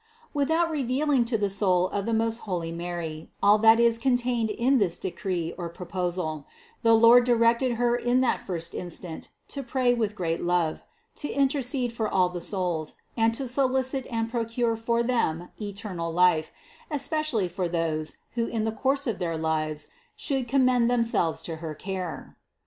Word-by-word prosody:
272. 315 Hz, +3 st, +2 dB
Without 330 Hz, -, -2 dB
revealing 275 Hz, -1 st, +1 dB
to 230 Hz, -1 st, 0 dB
the 205 Hz, -1 st, +1 dB
soul 190 Hz, -2 st, +2 dB
of 200 Hz, +1 st, -3 dB
the -, -, 0 dB
most 225 Hz, +1 st, +1 dB
holy 175 Hz, -6 st, -3 dB
Mary 170 Hz, -2 st, -5 dB
all 205 Hz, +1 st, +6 dB
that 225 Hz, +1 st, +6 dB
is 235 Hz, -1 st, +4 dB
contained 245 Hz, -2 st, +1 dB
in 250 Hz, +5 st, +2 dB
this 180 Hz, -5 st, +1 dB
decree 180 Hz, -3 st, -3 dB
or 170 Hz, -1 st, -3 dB
proposal, 175 Hz, -3 st, -3 dB, 0.3 s
the 230 Hz, -2 st, +5 dB
Lord 230 Hz, +2 st, +7 dB
directed 235 Hz, +1 st, +3 dB
Her 240 Hz, +1 st, +1 dB
in 245 Hz, +1 st, +1 dB
that 255 Hz, -, +1 dB
first 170 Hz, -3 st, -4 dB
instant 175 Hz, -1 st, -6 dB, 0.2 s
to 280 Hz, -, -4 dB
pray 250 Hz, -1 st, +1 dB
with 220 Hz, -3 st, -1 dB
great 165 Hz, -4 st, -2 dB
love, 175 Hz, -2 st, 0 dB, 0.4 s
to 295 Hz, -, -3 dB
intercede 265 Hz, -3 st, 0 dB
for 220 Hz, -2 st, -1 dB
all 180 Hz, -1 st, +3 dB
the 180 Hz, -1 st, -6 dB
souls, 175 Hz, -4 st, -1 dB, 0.2 s
and 225 Hz, -1 st, +3 dB
to 270 Hz, -, -1 dB
solicit 260 Hz, +1 st, 0 dB
and 225 Hz, -2 st, -1 dB
procure 230 Hz, 0 st, -1 dB
for 235 Hz, +1 st, 0 dB
them 180 Hz, -9 st, 0 dB
eternal 200 Hz, -5 st, -4 dB
life, 170 Hz, -2 st, +3 dB, 0.4 s
especially 295 Hz, -, 0 dB
for 175 Hz, 0 st, -3 dB
those, 160 Hz, -2 st, -2 dB, 0.2 s
who 230 Hz, -1 st, -1 dB
in 225 Hz, -2 st, -2 dB
the 220 Hz, -, 0 dB
course 275 Hz, +5 st, 0 dB
of 230 Hz, -, -2 dB
their 165 Hz, -3 st, -2 dB
lives 155 Hz, -1 st, -2 dB, 0.3 s
should 270 Hz, -4 st, -2 dB
commend 255 Hz, -2 st, +3 dB
themselves 230 Hz, -9 st, +1 dB
to 165 Hz, -2 st, -5 dB
her 160 Hz, -1 st, -6 dB
care. 185 Hz, 0 st, -6 dB
225 Hz, 170 wpm, -26 LUFS, 175-245 Hz, 0.4 s, Lord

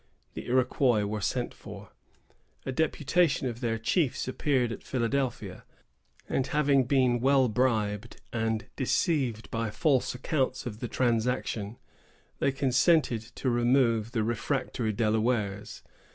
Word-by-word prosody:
The -, -, -7 dB
Iroquois 125 Hz, -2 st, +2 dB
were 105 Hz, +1 st, -3 dB
sent -, -, -2 dB
for. -, -, -11 dB, 0.7 s
A -, -, -2 dB
deputation 160 Hz, +2 st, +1 dB
of 120 Hz, 0 st, -5 dB
their 115 Hz, -2 st, 0 dB
chiefs 130 Hz, -, 0 dB
appeared 130 Hz, -2 st, 0 dB
at -, -, -6 dB
Philadelphia, 130 Hz, +1 st, -2 dB, 0.6 s
and 130 Hz, -, -1 dB
having 140 Hz, -3 st, +2 dB
been 125 Hz, -2 st, +2 dB
well 135 Hz, +1 st, +4 dB
bribed, 110 Hz, -2 st, -1 dB
and 110 Hz, -1 st, -1 dB
deceived 130 Hz, -, 0 dB
by 115 Hz, -1 st, -1 dB
false 130 Hz, +3 st, +1 dB
accounts 130 Hz, 0 st, -1 dB
of 110 Hz, -3 st, -6 dB
the 120 Hz, -, -3 dB
transaction, 115 Hz, -3 st, -1 dB, 0.6 s
they 140 Hz, -, +2 dB
consented 135 Hz, -1 st, +2 dB
to 130 Hz, -, -1 dB
remove 120 Hz, -2 st, +2 dB
the 115 Hz, -3 st, 0 dB
refractory 120 Hz, 0 st, -1 dB
Delawares. 110 Hz, -2 st, -1 dB
120 Hz, 125 wpm, -28 LUFS, 110-135 Hz, 0.7 s, well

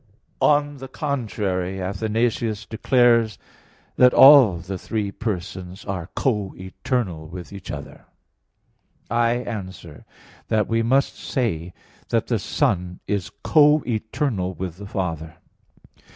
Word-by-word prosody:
On 145 Hz, -1 st, +3 dB
the 135 Hz, 0 st, -8 dB
contrary, 105 Hz, -, -2 dB
Athanasius 110 Hz, +3 st, -1 dB
declares 115 Hz, -2 st, +3 dB, 0.6 s
that 125 Hz, 0 st, +6 dB
"all 135 Hz, -9 st, +8 dB
the 90 Hz, +3 st, -6 dB
three 105 Hz, -1 st, -3 dB
persons 95 Hz, -2 st, -5 dB
are 95 Hz, -3 st, -4 dB
co 105 Hz, -7 st, -1 dB
eternal 95 Hz, -3 st, -3 dB
with 90 Hz, +3 st, -9 dB
each 100 Hz, -3 st, -9 dB
other." 70 Hz, -1 st, -8 dB, 1.1 s
I 115 Hz, 0 st, +3 dB
answer 95 Hz, -10 st, -6 dB, 0.4 s
that, 110 Hz, -3 st, +1 dB
We 115 Hz, 0 st, +1 dB
must 130 Hz, +4 st, +1 dB
say 90 Hz, -, -2 dB, 0.3 s
that -, -, +1 dB
the -, -, 0 dB
Son 90 Hz, 0 st, -1 dB
is 100 Hz, -4 st, -2 dB
co 150 Hz, -1 st, +5 dB
eternal 110 Hz, -4 st, -2 dB
with 90 Hz, 0 st, -5 dB
the 100 Hz, +1 st, -9 dB
Father. 80 Hz, -5 st, -4 dB
105 Hz, 115 wpm, -23 LUFS, 90-120 Hz, 1.1 s, all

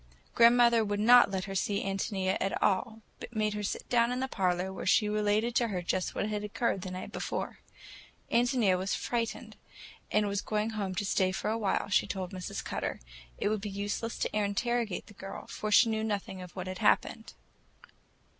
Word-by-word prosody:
Grandmother 235 Hz, -1 st, +6 dB
would 205 Hz, -1 st, -2 dB
not 240 Hz, +2 st, +7 dB
let 190 Hz, -1 st, -2 dB
her 195 Hz, -, -6 dB
see 200 Hz, +1 st, 0 dB
Ántonia 195 Hz, -1 st, -1 dB
at 195 Hz, -, -1 dB
all, 220 Hz, +3 st, 0 dB, 0.2 s
but 235 Hz, -, -9 dB
made 215 Hz, -1 st, +1 dB
her 210 Hz, -, -3 dB
sit 205 Hz, -, -4 dB
down 235 Hz, 0 st, +3 dB
in 250 Hz, -, -2 dB
the 265 Hz, -, -1 dB
parlor 185 Hz, -4 st, -1 dB
while -, -, -6 dB
she 210 Hz, +2 st, +4 dB
related 210 Hz, +2 st, +1 dB
to 235 Hz, 0 st, +2 dB
her 185 Hz, -5 st, -3 dB
just 185 Hz, +1 st, -1 dB
what -, -, -1 dB
had 210 Hz, -1 st, -3 dB
occurred 210 Hz, -1 st, -1 dB
the 185 Hz, -, -5 dB
night 185 Hz, 0 st, -6 dB
before. -, -, -4 dB, 0.7 s
Ántonia 235 Hz, -6 st, +3 dB
was 190 Hz, +2 st, -1 dB
frightened, 230 Hz, -2 st, -3 dB, 0.5 s
and 210 Hz, -1 st, +2 dB
was 200 Hz, 0 st, -1 dB
going 215 Hz, +1 st, -1 dB
home 200 Hz, -4 st, -3 dB
to 205 Hz, -, -1 dB
stay 185 Hz, -1 st, +2 dB
for 200 Hz, +3 st, -2 dB
a 225 Hz, -, 0 dB
while, 200 Hz, -3 st, 0 dB
she 195 Hz, -, +2 dB
told 185 Hz, -2 st, -4 dB
Mrs. 185 Hz, -2 st, -5 dB
Cutter; -, -, -3 dB, 0.4 s
it -, -, 0 dB
would 215 Hz, -1 st, -1 dB
be 205 Hz, -, -4 dB
useless 205 Hz, +3 st, -3 dB
to -, -, -2 dB
interrogate 215 Hz, +1 st, -1 dB
the -, -, -15 dB
girl, 195 Hz, -1 st, -8 dB
for 215 Hz, -, -5 dB
she 230 Hz, +3 st, +7 dB
knew 220 Hz, -1 st, -1 dB
nothing 200 Hz, -3 st, -3 dB
of 180 Hz, -1 st, -11 dB
what 185 Hz, -1 st, -4 dB
had 185 Hz, 0 st, -6 dB
happened. -, -, +1 dB
205 Hz, 200 wpm, -30 LUFS, 190-225 Hz, 0.7 s, not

